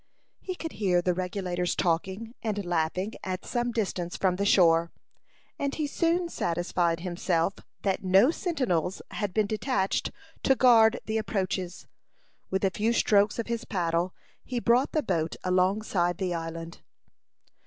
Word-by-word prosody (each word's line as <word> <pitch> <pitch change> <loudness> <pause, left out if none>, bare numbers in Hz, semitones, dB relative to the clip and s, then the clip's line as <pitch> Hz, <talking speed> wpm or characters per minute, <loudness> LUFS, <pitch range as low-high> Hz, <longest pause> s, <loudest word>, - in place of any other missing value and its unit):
He 370 - -5
could 325 -2 -5
hear 185 -4 +1
the 180 0 +1
Regulators 180 -1 -2
talking 190 +6 -1
and 205 -3 -2
laughing 175 +4 -1
at 185 0 -4
some 240 0 -1
distance 185 -6 -2
from 185 -2 +1
the 200 +1 0
shore, 170 -3 +4 0.7
and 280 0 -1
he 310 - -1
soon 335 +4 +1
satisfied 170 - -1
himself 175 0 0 0.3
that 195 -1 0
no 190 +9 +5
sentinels 250 - -1
had 205 -3 -2
been 215 +3 +2
detached 210 -2 0 0.3
to 270 - +4
guard 235 -3 +5
the 220 0 0
approaches. 190 -3 -3 0.6
With 190 +1 0
a 190 - +2
few 220 +4 0
strokes 205 -2 +3
of 230 - -2
his 235 0 -3
paddle, 175 -1 -1 0.3
he 250 -1 -3
brought 240 +3 +2
the 310 - +1
boat 165 -7 -1
alongside 185 -1 +1
the 185 -2 -1
island. 165 0 -6
190 Hz, 145 wpm, -28 LUFS, 175-225 Hz, 0.7 s, no